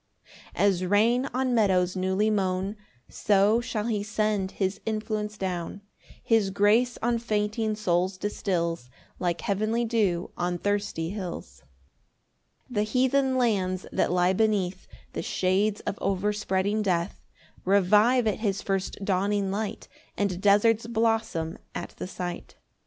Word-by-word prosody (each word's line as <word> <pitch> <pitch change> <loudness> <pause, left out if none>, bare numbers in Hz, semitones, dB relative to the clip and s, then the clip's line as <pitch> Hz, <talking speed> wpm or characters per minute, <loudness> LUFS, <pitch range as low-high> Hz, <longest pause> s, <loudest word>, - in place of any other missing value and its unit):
4 - - -25 0.3
As 190 -3 +3
rain 230 +7 +3
on 255 0 0
meadows 185 -5 +2
newly 190 +3 +1
mown 190 0 0 0.3
So 205 +3 +3
shall 215 -3 -3
he 220 -3 0
send 210 -2 -1
his 190 0 -2
influence 215 -1 -3
down; 185 0 -4 0.4
His 220 -4 +3
grace 210 +5 +3
on 235 0 +1
fainting 215 -1 -1
souls 185 -2 0
distils 170 -9 -2 0.3
Like 175 -2 -1
heavenly 215 +4 0
dew 205 -7 0
on 175 0 -1
thirsty 205 -4 -1
hills. 170 - -7 1.0
5 250 - -13
The 210 - +1
heathen 260 +4 +2
lands 190 -7 0
that - - +1
lie 180 +1 +3
beneath 200 -3 0 0.3
The - - -3
shades 195 +3 0
of - - -4
overspreading 200 +1 0
death, 180 -3 -1 0.4
Revive 210 +6 +4
at 215 - 0
his 200 -3 -1
first 195 0 -2
dawning 200 +1 +1
light, 210 +1 -4 0.3
And 190 -3 -1
deserts 215 +3 +4
blossom 225 -8 0 0.2
at - - -4
the - - -5
sight. 180 -1 -6
205 Hz, 130 wpm, -27 LUFS, 185-220 Hz, 1.0 s, Revive